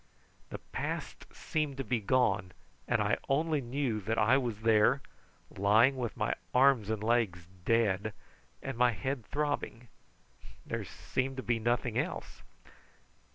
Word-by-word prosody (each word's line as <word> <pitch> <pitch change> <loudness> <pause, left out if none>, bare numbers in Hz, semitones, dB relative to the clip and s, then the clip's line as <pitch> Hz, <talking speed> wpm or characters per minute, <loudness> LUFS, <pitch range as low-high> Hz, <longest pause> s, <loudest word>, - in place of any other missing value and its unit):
The - - -5
past - - -5
seemed 150 -3 -2
to 135 - -2
be 125 -2 0
gone, 100 -5 +1 0.3
and - - +2
I - - +1
only 150 +2 +1
knew 120 -3 -2
that 110 +3 -2
I 110 +4 +5
was 120 -5 -1
there, 115 +4 +4 0.5
lying 110 +7 +4
with 120 -4 -4
my - - 0 0.2
arms 125 -5 +5
and 110 -1 -2
legs 110 -7 +1 0.2
dead 110 -2 +2 0.5
and 135 -3 -5
my 125 -1 +4
head 130 +5 -3
throbbing. 145 -5 -2 0.8
There - - -3
seemed 130 +1 -3
to 130 - -4
be 120 -1 0
nothing 120 +2 0
else. - - -4
120 Hz, 140 wpm, -31 LUFS, 110-135 Hz, 0.8 s, I